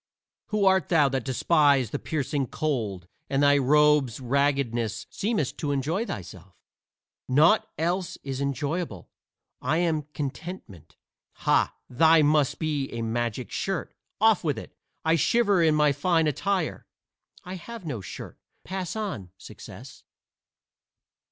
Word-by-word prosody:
"Who 210 -2 0
art 190 -4 +3
thou 150 -5 +4
that 135 -2 -2
despite 140 - +3
the - - -2
piercing 140 -3 -2
cold 110 - -3 0.2
and 140 +1 +1
thy 145 0 +5
robe's 150 -3 +3
raggedness 125 -4 0
seemest 205 - -2
to 145 - -1
enjoy 160 - -1
thyself?" 95 -1 -8 0.7
"Naught 165 +11 +4
else 175 +2 -1
is 135 -1 -4
enjoyable 140 - -3 0.5
I 145 +5 +1
am 160 -4 0
Contentment." 135 - -7 0.5
"Ha! - - +3
thine 160 +4 +5
must 150 -2 +2
be 150 -4 -2
a 115 -1 -3
magic 120 +1 -2
shirt. 195 0 -3 0.3
Off 220 -3 +4
with 150 -4 0
it! - - -9 0.3
I 160 +1 +4
shiver 205 +1 +3
in 160 -2 +4
my 150 -1 +4
fine 165 +3 +1
attire." 160 +4 -1 0.6
"I 180 - -7
have 225 +2 -9
no 125 -9 -4
shirt. 95 - -9 0.2
Pass 185 0 -4
on, 195 - -4
Success." - - -12
150 Hz, 130 wpm, -26 LUFS, 130-170 Hz, 0.7 s, thy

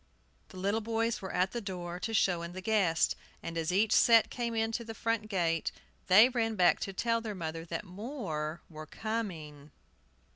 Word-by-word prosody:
The 185 - -12
little 200 +4 0
boys 230 +1 -1
were 190 - -5
at 185 +1 +1
the 240 - -4
door, 180 -3 -5
to 225 - -3
show 185 -6 +2
in 170 +1 -6
the 185 - -6
guests, 190 -6 +2 0.3
and 165 - -5
as 165 +1 -1
each 205 +4 +2
set 230 0 +6
came 230 -2 -1
to 235 +1 -3
the 225 -1 -8
front 230 -1 -1
gate, 165 -5 0 0.4
they 205 +6 +8
ran 230 -3 -1
back 180 -3 +4
to 195 - -3
tell 230 +4 0
their 215 -2 -5
mother 165 -2 -5
that 165 +2 -4
more 180 - -5
were 155 -1 -10
coming. 165 -10 -5
195 Hz, 185 wpm, -31 LUFS, 170-225 Hz, 0.4 s, they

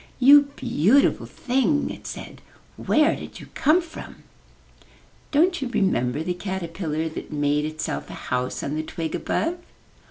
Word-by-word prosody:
''You 285 +2 +8
beautiful 225 - +2
thing," 270 +3 0
it - - -9
said, - - -8 0.3
*'where 305 +2 +2
did - - -9
you - - -12
come 320 +5 +3
from?'* 330 - -11 1.1
''Don't 345 +4 +3
you 265 - -1
remember 150 - 0
the 180 - -1
caterpillar 170 -4 -3
that 160 - -7
made 145 0 +1
itself 155 0 -4
a - - -7 0.2
house 125 0 -1
on 140 - -3
the 155 - -1
twig 160 0 -5
above?' 345 +2 -1
190 Hz, 145 wpm, -24 LUFS, -, 1.1 s, You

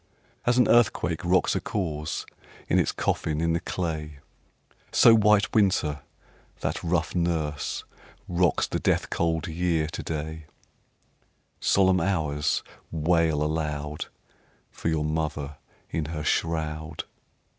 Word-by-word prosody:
2. - - +3
As 120 - +3
an 125 - +5
earthquake 105 -8 +3
rocks 90 0 +3
a - - 0
corse 75 -6 -3 0.4
In - - +3
its - - +2
coffin 75 -1 -1
in 85 0 +1
the 85 - +1
clay, 80 -4 -4 0.7
So 115 - +7
White 105 -1 +4
Winter, 90 -9 +2 0.6
that - - -2
rough 85 -1 0
nurse, 80 -4 -1 0.4
Rocks 90 -1 +2
the - - -2
death - - +1
cold 80 -2 0
Year 85 -1 0
to 75 - -5
day; 80 0 -5 1.1
_10 - - -16
Solemn 95 -1 +4
Hours! 75 -5 0 0.3
wail 80 -1 +2
aloud 75 -1 -2 0.6
For - - -3
your 80 -2 0
mother 75 -2 -2 0.3
in 80 - -1
her 75 0 -4
shroud. 80 -1 -1
80 Hz, 125 wpm, -26 LUFS, 75-90 Hz, 1.1 s, So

